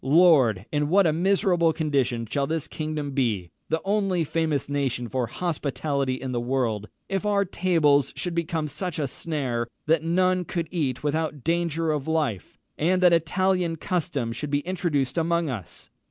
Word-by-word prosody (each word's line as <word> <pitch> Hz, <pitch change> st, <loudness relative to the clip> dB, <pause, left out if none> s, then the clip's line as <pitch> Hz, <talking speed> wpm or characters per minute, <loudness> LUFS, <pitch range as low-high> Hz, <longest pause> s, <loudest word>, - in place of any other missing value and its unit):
Lord! 135 Hz, -, +5 dB
in 150 Hz, -1 st, 0 dB
what 195 Hz, +3 st, +5 dB
a 160 Hz, -, +3 dB
miserable 175 Hz, -1 st, +3 dB
condition 135 Hz, -7 st, 0 dB
shall 140 Hz, +5 st, -1 dB
this 160 Hz, -2 st, -2 dB
kingdom 155 Hz, -2 st, -4 dB
be 110 Hz, -10 st, -1 dB, 0.2 s
(the 160 Hz, -, +1 dB
only 195 Hz, -4 st, +1 dB
famous 155 Hz, -2 st, -1 dB
nation 135 Hz, -4 st, -1 dB
for 125 Hz, 0 st, -1 dB
hospitality 140 Hz, -5 st, -2 dB
in 130 Hz, 0 st, -5 dB
the 120 Hz, -, -1 dB
world) 120 Hz, -4 st, -1 dB, 0.2 s
if 195 Hz, 0 st, -2 dB
our 200 Hz, -1 st, +2 dB
tables 160 Hz, -7 st, +2 dB
should 180 Hz, -, -3 dB
become 165 Hz, -2 st, -1 dB
such 155 Hz, +4 st, -4 dB
a 145 Hz, -3 st, 0 dB
snare, 135 Hz, -4 st, -2 dB
as 120 Hz, -, -3 dB, 0.2 s
that 160 Hz, 0 st, +2 dB
none 185 Hz, +2 st, +2 dB
could 170 Hz, -1 st, -3 dB
eat 145 Hz, -8 st, -1 dB
without 150 Hz, -2 st, -1 dB
danger 165 Hz, -1 st, 0 dB
of 150 Hz, -2 st, -2 dB
life, 150 Hz, -, -1 dB, 0.2 s
and 185 Hz, +4 st, +2 dB
that 175 Hz, -1 st, +7 dB
Italian 180 Hz, +1 st, +1 dB
custom 160 Hz, -8 st, -2 dB
should 140 Hz, +5 st, -5 dB
be 145 Hz, 0 st, +1 dB
introduced 165 Hz, -5 st, -1 dB
among 170 Hz, -2 st, +1 dB
us! 105 Hz, -8 st, -8 dB
155 Hz, 170 wpm, -25 LUFS, 135-170 Hz, 0.2 s, that